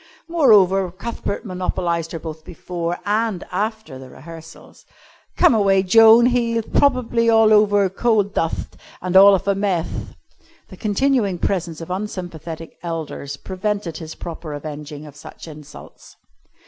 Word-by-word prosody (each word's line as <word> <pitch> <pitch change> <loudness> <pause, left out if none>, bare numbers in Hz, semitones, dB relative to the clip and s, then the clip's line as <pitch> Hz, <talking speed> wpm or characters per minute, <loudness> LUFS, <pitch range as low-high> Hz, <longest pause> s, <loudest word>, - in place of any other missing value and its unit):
Moreover 200 - +4
Cuthbert 200 +3 -5
monopolised 175 -3 -2
her - - -4
both 160 -1 -8
before 175 +1 -5
and 210 -2 -1
after 210 - -4
the 130 -1 -11
rehearsals. 165 +4 -13 0.5
"Come - - +5
away, 195 -3 +3
Joan, 225 +4 +7
he'th 235 -2 0
prob'bly 240 -4 +2
all 225 -1 +5
over 205 -2 +4
coal 215 +3 +1
dutht 180 -5 -4 0.2
and 185 0 -4
all 200 +1 +8
of 195 +1 -5
a 200 - +3
meth." 195 -4 -3 0.5
The - - -12
continued 215 -3 0
presence 170 -4 -2
of 165 - -7
unsympathetic 175 -5 -6
elders 160 -4 -5
prevented 190 -1 -4
his 160 -2 -8
proper 165 -2 -7
avenging 150 0 -8
of 145 -2 -13
such 150 - -12
insults. 150 -2 -13
185 Hz, 135 wpm, -20 LUFS, 165-215 Hz, 0.5 s, all